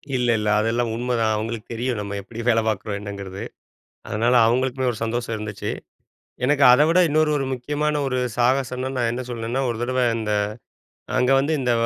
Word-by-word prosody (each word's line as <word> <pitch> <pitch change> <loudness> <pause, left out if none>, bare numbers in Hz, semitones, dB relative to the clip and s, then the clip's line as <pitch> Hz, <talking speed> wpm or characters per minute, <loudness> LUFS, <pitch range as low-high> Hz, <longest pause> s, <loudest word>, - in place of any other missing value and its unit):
இல்ல. 125 -1 +1
இல்ல. 105 - -2
அதெல்லாம் 115 +1 0
உண்மைதான். 115 -2 0
அவுங்களுக்கு 110 +1 -4
தெரியும். 120 -1 -2
நம்ம 100 0 -5
எப்படி 110 +3 -10
வேலை 115 -1 +4
பார்க்குறோம் 105 -1 -2
என்னங்கிறது. 100 -2 -7 0.7
அதனால 115 +4 +1
அவுங்களுக்குமே 130 +2 +1
ஒரு 110 - -8
சந்தோஷம் 115 0 -2
இருந்துச்சி. 105 -1 -5 0.7
எனக்கு 140 +1 +2
அத 125 +4 +6
விட 170 +2 +3
இன்னொரு 155 +1 +2
ஒரு 135 - -1
முக்கியமான 145 +4 -1
ஒரு 130 -1 -1 0.2
சாகசம்ன்னா, 125 +1 +1
நான் 120 -2 +1
என்ன 125 +1 -3
சொல்வேன்னா, 120 +2 -2
ஒரு 120 - -2
தடவ 130 +1 0 0.2
இந்த 110 -1 -2 0.8
அங்க 125 +1 +2
வந்து 140 +4 +1
இந்த 125 -2 +1
120 Hz, 165 wpm, -23 LUFS, 110-130 Hz, 0.8 s, அத